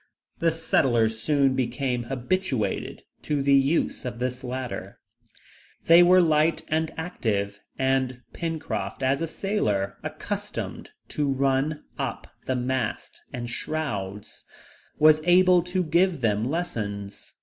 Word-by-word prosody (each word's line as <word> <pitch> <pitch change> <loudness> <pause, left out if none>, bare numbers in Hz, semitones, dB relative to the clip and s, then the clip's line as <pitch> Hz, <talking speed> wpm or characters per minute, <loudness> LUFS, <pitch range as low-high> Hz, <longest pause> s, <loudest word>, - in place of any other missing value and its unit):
The 165 - +3
settlers 120 -9 +1
soon 140 +1 +2
became 125 -1 -1
habituated 130 - -2 0.2
to 145 -2 -1
the 140 0 +4
use 140 +4 +2
of 125 -2 -5
this 125 +1 -3
ladder. 130 0 -5 0.9
They 170 +1 +8
were 180 +1 +6
light 155 0 +2
and 160 0 0
active, 105 - -2 0.2
and 130 -1 0
Pencroft, 135 - -4
as 135 +3 +1
a 165 - -1
sailor, 105 - -1
accustomed - - -5 0.2
to 145 -2 0
run 135 +3 0 0.2
up - - -3 0.2
the 130 - +1
masts 125 -2 -3
and 120 -1 -5
shrouds, 105 -8 -4 0.5
was 155 0 +6
able 180 +1 +5
to 180 +1 0
give 170 -1 +2
them 110 +1 +1
lessons. 105 - -4
135 Hz, 120 wpm, -25 LUFS, 120-160 Hz, 0.9 s, They